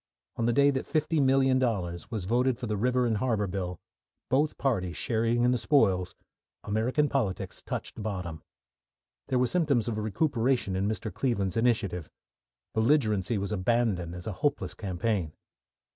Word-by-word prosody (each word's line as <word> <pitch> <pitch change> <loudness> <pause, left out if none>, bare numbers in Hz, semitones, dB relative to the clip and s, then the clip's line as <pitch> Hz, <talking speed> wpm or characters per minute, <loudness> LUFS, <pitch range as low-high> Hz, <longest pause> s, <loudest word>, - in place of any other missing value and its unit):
On 115 - 0
the - - +3
day 140 +3 +5
that 130 -1 -3
$50,000,000 130 - +1
was 110 -6 -4
voted 125 +4 +2
for 125 - -5
the 110 -2 -1
River 125 +4 +1
and 115 -2 +1
Harbour 110 -2 0
Bill, 90 -2 -4 0.5
both 145 +4 +2
parties 95 -10 -1
sharing 115 +1 +1
in 125 - +4
the 125 - +1
spoils, 95 -8 +2 0.5
American 115 +8 +1
politics 115 -10 -2
touched - - -5
bottom. 90 -7 -4 0.9
There 130 - +1
were 125 - +3
symptoms 140 -6 +1
of 110 -2 -2
recuperation 115 - 0
in 95 +2 0
Mr. 110 0 -3
Cleveland's 100 -8 -1
initiative. 110 -8 0 0.6
Belligerency 110 - +2
was 100 0 -3
abandoned 100 -4 0
as 90 - -8
a 110 - -2
hopeless 145 -1 0
campaign. 95 -3 -2
115 Hz, 145 wpm, -28 LUFS, 95-130 Hz, 0.9 s, day